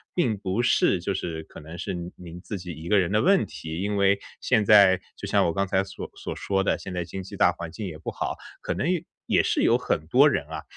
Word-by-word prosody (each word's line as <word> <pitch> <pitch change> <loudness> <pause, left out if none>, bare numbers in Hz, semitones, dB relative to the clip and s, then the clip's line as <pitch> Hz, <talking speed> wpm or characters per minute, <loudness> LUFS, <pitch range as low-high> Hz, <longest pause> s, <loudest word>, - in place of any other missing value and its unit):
并 120 - +1
不 95 +3 -1
是 95 -6 +3
就 100 +3 -1
是 80 -4 -4
可 - - -13
能 80 +3 -10
是 90 - -4
您 85 0 -6
您 85 -1 -10
自 100 - -5
己 90 -1 -7
一 80 +1 -8
个 105 - +4
人 90 -2 +2
的 105 +1 +3
问 195 +2 +4
题。 80 +2 -6
因 105 +1 -1
为 100 0 +3 0.2
现 110 - +2
在 100 -3 +6 0.2
就 - - -6
像 - - +3
我 85 - 0
刚 100 +2 0
才 95 +1 +1
所 95 - -8
所 - - -5
说 95 -1 -1
的， - - +1
现 95 - -8
在 90 - -2
经 95 +3 -6
济 95 - -9
大 - - +4
环 85 -1 -7
境 100 +4 -6
也 80 - -7
不 80 - -6
好， - - -3 0.2
可 - - -2
能 155 - -1
也 180 -3 0 0.2
也 - - +3
是 - - +1
有 120 - +5
很 105 -11 -2
多 135 - +6
人 75 - -1
啊， 80 -1 -6
95 Hz, 285 characters per minute, -25 LUFS, 85-105 Hz, 0.2 s, 在